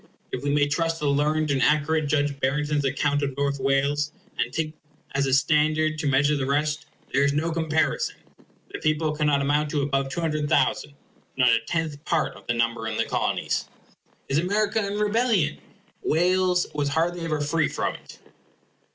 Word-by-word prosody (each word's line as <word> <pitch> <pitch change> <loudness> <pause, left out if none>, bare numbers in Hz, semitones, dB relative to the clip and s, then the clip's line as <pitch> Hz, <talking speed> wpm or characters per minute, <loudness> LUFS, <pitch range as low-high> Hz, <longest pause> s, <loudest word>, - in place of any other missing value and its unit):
If 125 - -3
we 145 - 0
may 145 0 +3
trust 165 +3 -1
the 150 - -3
learned 150 +2 +1
and 135 -2 +1
accurate 150 +1 +2
Judge 145 -1 0
Barrington's 145 +2 0
account 145 +1 +1
of 140 -2 -3
North 140 0 0
Wales, 140 +2 +1 0.3
and 120 - 0
take 155 +2 -2
that 150 -3 -9
as 140 - +2
a 135 - 0
standard 155 +2 +2
to 150 - -1
measure 140 +2 +3
the 135 -2 -2
rest, 150 +1 0 0.3
there 140 - +3
is 140 0 +2
no 160 +3 0
comparison. 160 -1 0 0.6
The - - -5
people 155 0 0
cannot 150 -2 +2
amount 145 +2 +1
to 145 -1 0
above 135 -1 0
200,000; 150 -2 0 0.4
not 125 -1 +5
a 115 - +4
tenth 160 -3 -2
part 165 -2 0
of - - -16
the 120 - 0
number 115 -1 0
in 110 - -3
the - - +1
Colonies. - - -1 0.6
Is 140 +2 +1
America 205 +4 +1
in 200 +1 -3
rebellion? 210 -6 +1 0.4
Wales 180 +2 +2
was 145 -1 -1
hardly 165 +3 0
ever 155 -2 -1
free 150 +1 +1
from - - -2
it. - - -13
150 Hz, 175 wpm, -25 LUFS, 140-160 Hz, 0.6 s, not